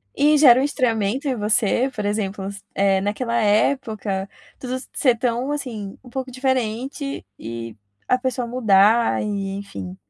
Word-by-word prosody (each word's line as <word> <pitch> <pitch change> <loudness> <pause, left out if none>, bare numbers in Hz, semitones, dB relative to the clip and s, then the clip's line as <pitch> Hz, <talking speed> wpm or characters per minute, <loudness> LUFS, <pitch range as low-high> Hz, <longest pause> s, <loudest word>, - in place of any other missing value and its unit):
E 300 +2 +4
gera 260 -4 +7
um - - +1
estranhamento 250 -2 0
em 255 - 0
você, 215 +4 +2
por 210 - -4
exemplo, 200 -2 -2 0.3
eh, 195 -1 +3
naquela 230 +4 -2
época, 210 -3 0 0.3
tudo 255 0 -4 0.2
ser 250 -4 +2
tão 245 +3 -1
assim, 230 -9 -5
um 250 - -14
pouco 260 +1 -4
diferente 260 +2 -2
e 115 0 -7 0.3
a 255 - +3
pessoa 255 -1 -2
mudar 225 -1 +3
e 200 -2 -3
enfim 95 - -7
230 Hz, 145 wpm, -22 LUFS, 200-255 Hz, 0.3 s, gera